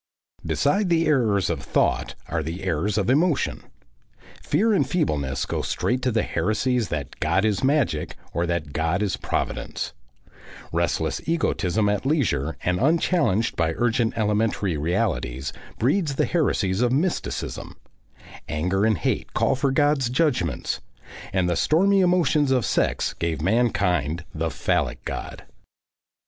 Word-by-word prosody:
Beside 200 -2 +1
the 165 -1 +3
errors 115 -10 +2
of - - -2
thought - - 0
are 85 -1 -1
the 80 +5 -5
errors 95 +3 0
of 100 -3 +1
emotion. 150 +4 +1 0.8
Fear 220 +2 +2
and 140 -9 +2
feebleness 75 - 0
go - - -2
straight 125 +1 -1
to 125 - +1
the 110 -1 +1
Heresies 110 +6 0
that 75 -3 -5
God 85 +6 +2
is 105 0 0
Magic 135 - +1 0.2
or 85 +1 0
that 80 -5 -2
God 80 +5 0
is 100 - 0
Providence; - - -3 0.8
restless - - 0
egotism 110 - +1
at 105 -1 0
leisure 110 - 0
and 90 0 +1
unchallenged 145 - +2
by 80 -1 +1
urgent 120 -1 +1
elementary 105 -4 +1
realities 75 - -1 0.2
breeds 145 - +1
the - - +2
Heresies 110 - 0
of 125 -1 +2
Mysticism, 160 +7 -2 0.7
anger 90 +7 0
and 110 -3 +2
hate - - -2
call - - +2
for 135 +1 +1
God's 145 -2 +2
Judgments, 125 - 0 0.5
and 95 -2 +1
the 85 - +1
stormy 195 - +3
emotions 175 -6 +3
of 130 -4 +2
sex - - 0
gave 85 -2 -2
mankind 90 -5 +1
the 80 0 -1
Phallic 70 - -1
God. - - -6
110 Hz, 135 wpm, -24 LUFS, 85-140 Hz, 0.8 s, the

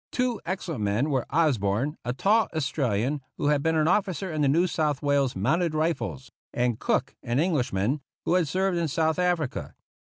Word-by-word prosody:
Two 250 -3 -1
excellent 175 - -3
men 110 +9 +1
were 130 -3 0
Osborne, 135 -3 +1
a 120 - -2
tall 205 - +2
Australian, 135 -3 0 0.2
who 145 - +1
had 145 -1 +2
been 160 +2 +1
an 155 -1 +2
officer 190 -1 0
in 155 - -1
the 145 - +3
New 165 +6 +3
South 150 -5 -1
Wales 140 -3 +2
Mounted 155 - +1
Rifles; 155 -4 -2 0.2
and 120 -2 0
Cook, 130 +3 0
an 120 -1 -2
Englishman, 135 - 0 0.2
who - - +1
had 180 -3 +3
served 185 +2 0
in 165 - 0
South 160 +3 0
Africa. 175 -6 -1
150 Hz, 180 wpm, -26 LUFS, 130-170 Hz, 0.2 s, the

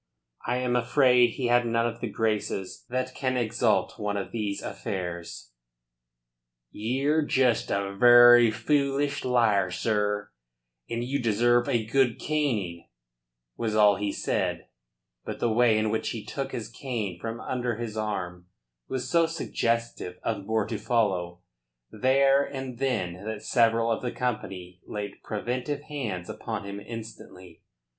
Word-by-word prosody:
I 120 +1 +1
am 125 -1 0
afraid 125 -1 +4
he 130 - -2
had 120 0 +3
none 115 0 +1
of 120 0 -3
the 120 - -2
graces 105 -3 -2
that 130 +1 -2
can 130 -1 -1
exalt 115 -1 +1
one 105 -1 -2
of 100 - -4
these 105 -3 -3
affairs. 85 -9 -5 1.2
"Ye're 135 +8 0
just 130 -5 +2
a 100 0 -1
very 120 +1 +8
foolish 140 +4 0
liar, 115 -7 +3
sir, 105 +1 -1 0.6
and 115 0 -2
you 135 +3 -2
deserve 120 +2 +3
a 115 -2 +1
good 125 +1 +2
caning," 115 - -2 0.7
was 110 -2 -2
all 105 -2 +5
he 100 0 -1
said, - - -2 0.5
but - - -6
the 115 -2 +1
way 115 -1 +4
in 110 0 +1
which 110 - -1
he 110 -2 -5
took 135 -1 -4
his 110 -3 -4
cane 115 -6 -4
from 115 +3 -5
under 125 -2 -2
his 115 -1 -5
arm 90 -5 -4 0.4
was 130 -1 -3
so 170 -1 +3
suggestive 115 - -2
of 100 -3 -3
more 110 -2 +1
to 110 - -4
follow 95 -6 0 0.5
there 135 +4 +3
and 130 -3 -6
then 95 -9 -1
that 110 -1 -5
several 115 -1 +3
of 110 - -1
the 125 - -2
company 95 -7 -4
laid 105 -1 -6
preventive 125 +6 -3
hands 110 -13 -4
upon - - -5
him 100 0 -6
instantly. 100 -6 -10
115 Hz, 145 wpm, -27 LUFS, 105-125 Hz, 1.2 s, very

